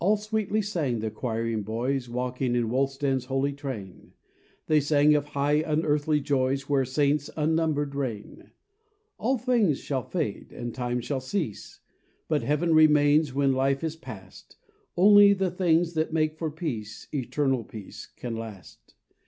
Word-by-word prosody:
A - - -4
ll - - +1
sweetly 215 0 -1
sang 160 - -1
the 110 0 -3
quiring 115 -1 -2
boys 120 +5 -2
Walking 125 +1 -2
in 115 -2 0
Wulstan's 135 0 0
holy 135 +2 -1
train: 130 - -8 0.5
They 155 -1 +4
sang 145 +1 +4
of 145 -1 +1
high 145 +2 +2
unearthly 150 -1 +1
joys 135 -1 0
Where 140 -2 +2
Saints 145 +2 +1
unnumbered 155 -2 0
reign. 125 -7 -5 0.7
"All 260 +4 +1
things 225 - +2
shall 135 -3 -2
fade, 150 - -4
and 120 -1 -6
time 125 -1 -2
shall 130 +2 -3
cease, 130 - -4 0.5
But 155 -2 +1
Heaven 155 +3 +1
remains 150 -1 +5
when 140 -1 +3
life 135 +2 +1
is 160 -1 -2
past; 160 - -12 0.4
Only 205 +2 +7
the 190 -2 -1
things 175 -1 +2
that 160 0 -1
make 155 -1 0
for 160 0 -3
peace, 125 -10 -5
Eternal 135 -2 0
peace, 105 -2 -10
can 120 -2 -6
last. 110 -5 -10
145 Hz, 150 wpm, -26 LUFS, 125-160 Hz, 0.7 s, Only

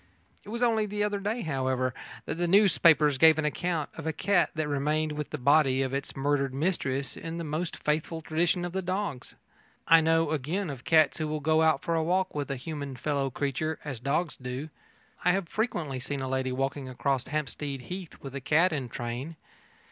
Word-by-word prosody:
It - - -12
was 235 +3 -2
only 220 -3 +2
the 205 0 -1
other 205 -1 0
day, 215 +4 -2
however, 130 - -1 0.3
that - - -2
the 175 - +1
newspapers 165 -7 +5
gave 160 0 +7
an 155 - 0
account 160 +1 -1
of - - -6
a - - +2
cat 195 +3 +2
that 155 -1 -1
remained 150 +2 0
with 150 -1 -4
the 150 - -4
body 135 -1 +4
of 130 0 -3
its 140 0 -3
murdered 140 -1 0
mistress 140 -4 -1
in 165 0 -6
the 170 - -3
most 160 +2 -3
faithful 155 +2 -1
tradition 170 +3 0
of 175 - -5
the 190 - -1
dogs. 185 -7 -3 0.5
I 165 0 +7
know, 165 -1 +2
again, 155 +5 -1
of 130 -3 -9
cats 160 0 +4
that 155 - -1
will 155 0 -2
go 155 +2 +3
out 160 -3 +3
for 170 - -1
a 165 -1 +1
walk 185 +3 +1
with 145 -1 -3
a 140 - -1
human 140 0 -5
fellow 140 +1 -1
creature, 145 +4 -2
as 135 -6 -5
dogs 150 +6 -1
do. 130 +4 -5 0.5
I 180 - +4
have 190 -2 -1
frequently 165 - -2
seen 135 +2 -4
a 130 - -3
lady 130 0 -1
walking 135 +1 -2
across 130 +1 -1
Hampstead 145 -2 -3
Heath 180 +4 -7
with 135 -1 -7
a 140 - -5
cat 160 +7 +3
in 135 -5 -3
train. 120 +8 -5
150 Hz, 205 wpm, -28 LUFS, 135-170 Hz, 0.5 s, gave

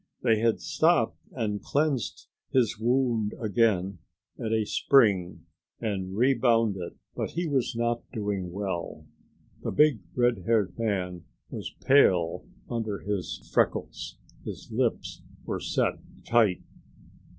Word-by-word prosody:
They 115 -3 +3
had 115 0 +1
stopped 80 0 +2
and 105 -2 -2
cleaned 140 - -1 0.3
his 120 -5 +2
wound 120 -3 +1
again 100 -4 +1 0.4
at 110 - -3
a 110 -1 +2
spring 100 -9 +3 0.3
and 95 -4 -3
rebound 115 -4 +3
it, 90 -2 -7 0.2
but - - -2
he 175 +2 -1
was 135 -4 0
not 120 0 0
doing 100 -4 -3
well. 95 -2 -4 0.6
The - - -3
big 150 -6 +4 0.2
redhaired 115 -5 +2
man 90 -6 -2 0.3
was - - -6
pale 90 -12 +4 0.2
under 110 -4 -3
his 100 -2 -4
freckles; - - 0 0.3
his - - -8
lips - - -1 0.2
were - - -2
set - - 0 0.3
tight. 110 -6 +3
110 Hz, 115 wpm, -27 LUFS, 95-120 Hz, 0.6 s, big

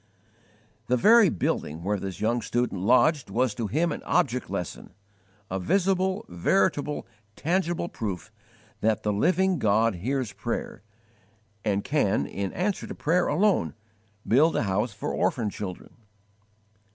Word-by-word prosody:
The 125 - +2
very 220 - +6
building 85 - -2
where 100 +2 0
this 95 -1 -6
young 115 +2 +1
student 120 -5 -1
lodged 130 - +3
was 125 -1 +1
to 115 0 -3
him 160 - +1
an - - -4
object 135 -8 0
lesson 90 -3 -5 0.5
a 95 0 -3
visible, 190 - +1
veritable, 145 - 0 0.3
tangible 175 +1 -1
proof 100 - -5 0.5
that 110 -1 +1
the 105 - +1
Living 185 - +2
God 110 0 +3
hears 125 +3 -2
prayer, - - -4 0.8
and 100 -1 0
can, 125 -9 +1
in 100 -1 -4
answer 190 +3 -2
to - - -7
prayer 175 +4 +1
alone, 155 - +2 0.5
build 150 +8 +4
a - - +1
house 105 +4 0
for 105 - -4
orphan 110 -5 0
children. 95 -3 -7
120 Hz, 135 wpm, -26 LUFS, 100-170 Hz, 0.8 s, very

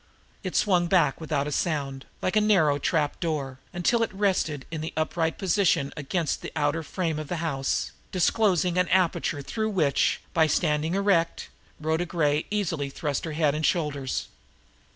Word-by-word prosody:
It 185 - -4
swung 180 -4 +3
back 170 -5 +2
without 150 -3 -1
a 150 - -3
sound, 140 -4 -2 0.2
like 185 - 0
a 215 - +5
narrow 165 -9 +3
trap 150 0 0
door, 140 -6 -2
until 185 +7 +1
it 230 - 0
rested 190 -8 0
in 160 -2 -4
an 160 - -3
upright 160 +1 0
position 175 -6 +2
against 155 +3 -2
the - - -6
outer 145 +3 +1
frame 160 -1 -2
of 155 - -5
the 175 - -2
house, 150 -5 -1 0.2
disclosing 180 -2 +2
an 180 - +2
aperture 170 -5 +1
through 220 +8 -2
which, 155 -9 +2
by 160 -3 +4
standing 155 +2 +1
erect, 195 -4 +1 0.3
Rhoda 160 +3 0
Gray 150 -3 +1
easily 165 -9 -1
thrust 145 +2 -3
her 160 - -4
head 150 -2 +2
and 155 +1 -3
shoulders. 145 -5 0
160 Hz, 165 wpm, -26 LUFS, 150-180 Hz, 0.3 s, a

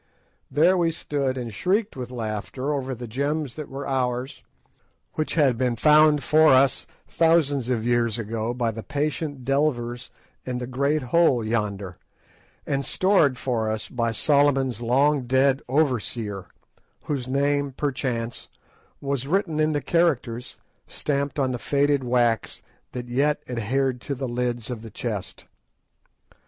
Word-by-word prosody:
There 170 +5 +4
we 170 -2 +2
stood 140 -5 -2
and 120 -3 -5
shrieked 200 - 0
with 125 -2 -6
laughter 120 +4 -3
over 135 -2 -3
the 120 +1 -7
gems 140 +3 -2
that 150 -2 -7
were 135 +1 -6
ours, 125 0 -2 0.7
which 155 - -2
had 135 -7 +3
been 125 -2 +1
found 150 +2 +5
for 155 +1 +5
us 130 0 +4 0.2
thousands 150 -6 +2
of 115 -3 0
years 120 -2 +1
ago 115 0 -3
by 120 -2 -1
the 110 +1 -7
patient 145 -1 -3
delvers 125 -4 0 0.3
in 125 -1 -3
the 125 - -4
great 140 +4 0
hole 150 -9 +4
yonder, 105 -5 -2 0.7
and 140 -1 -1
stored 165 -7 +2
for 115 -4 -1
us 110 0 -3
by 115 -2 -1
Solomon's 135 -1 +2
long 135 +2 +2
dead 135 +2 +3
overseer, 115 - -1 0.6
whose 135 -4 -3
name, 140 +1 +1
perchance, 125 -4 -3 0.5
was 140 -2 -2
written 165 -2 0
in 155 0 +3
the 145 -3 -1
characters 130 -8 0 0.3
stamped 140 0 -2
on 135 -2 +1
the 125 - -3
faded 140 0 +1
wax 120 -2 0 0.3
that 125 -1 -5
yet 140 +5 +1
adhered 125 +2 -1
to 140 - -4
the 135 0 -4
lids 120 -1 -2
of 115 -3 -5
the 115 - -9
chest. 105 -4 -5
130 Hz, 145 wpm, -24 LUFS, 120-145 Hz, 0.7 s, found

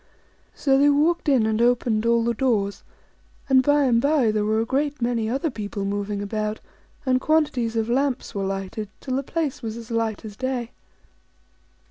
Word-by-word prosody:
So 270 -2 +2
they 290 +1 +5
walked 305 +3 +2
in 255 -6 +4
and 220 +1 0
opened 235 -2 +2
all 235 0 +3
the 235 0 +1
doors; 215 -5 0 0.7
and 265 -2 +5
by 290 +2 +3
and 235 -3 +3
by 280 -5 +3
there 215 -1 0
were 215 +1 +1
a 225 - 0
great 285 +3 -1
many 235 -2 0
other 275 +6 -1
people 205 -3 -5
moving 205 0 -2
about, 215 +1 -3 0.5
and 255 -1 +2
quantities 265 -8 +1
of 225 -1 0
lamps 260 +1 0
were 200 - -3
lighted, 195 +2 -4
till 260 -2 -3
the 270 - 0
place 305 0 -3
was 225 0 -5
as 235 0 -9
light 225 -1 -1
as 210 -2 -8
day. 255 -1 -3
235 Hz, 180 wpm, -24 LUFS, 215-270 Hz, 0.7 s, they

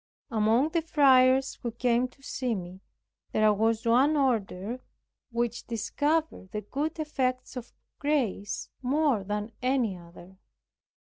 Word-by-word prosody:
Among 225 +6 +3
the 335 +1 0
friars 265 -4 +4
who 240 - -2
came 240 +1 +1
to 270 +2 -25
see 255 -4 -2
me, 185 0 -8 0.5
there 215 0 +4
was 225 +2 +1
one 265 +6 +4
order 230 -3 -1 0.5
which 235 -1 -2
discovered 290 - -1
the 210 - -3
good 285 - -3
effects 260 -5 -2
of 245 -2 -7 0.3
grace 260 -9 -1
more 270 -4 +1
than 210 +2 -3
any 250 -6 +1
other. 175 +2 -14
245 Hz, 125 wpm, -28 LUFS, 210-275 Hz, 0.5 s, friars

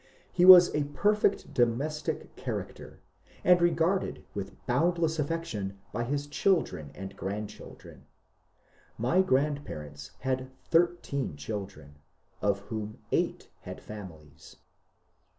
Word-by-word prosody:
He 180 0 +4
was 180 -1 +10
a 150 -1 +1
perfect 205 +7 +1
domestic 135 +6 -1
char - - -3
acter, - - -13 0.5
and 180 -1 +5
regarded 175 +2 +1
with 100 -1 -5
boundless 160 +4 +1
affection 140 -11 -3 0.2
by 120 +2 -1
his 145 +3 -2
children 145 - 0
and 95 +1 -8
grandchildren. 100 +3 -7 0.9
My 125 +12 +3
grandparents 130 - -2
had 130 0 -2 0.2
thirteen 165 - +1
children, 75 -4 -7 0.4
of 100 -1 +1
whom 110 +1 -6
eight - - -1
had - - -9
families. 80 -9 -11
130 Hz, 105 wpm, -29 LUFS, 100-165 Hz, 0.9 s, was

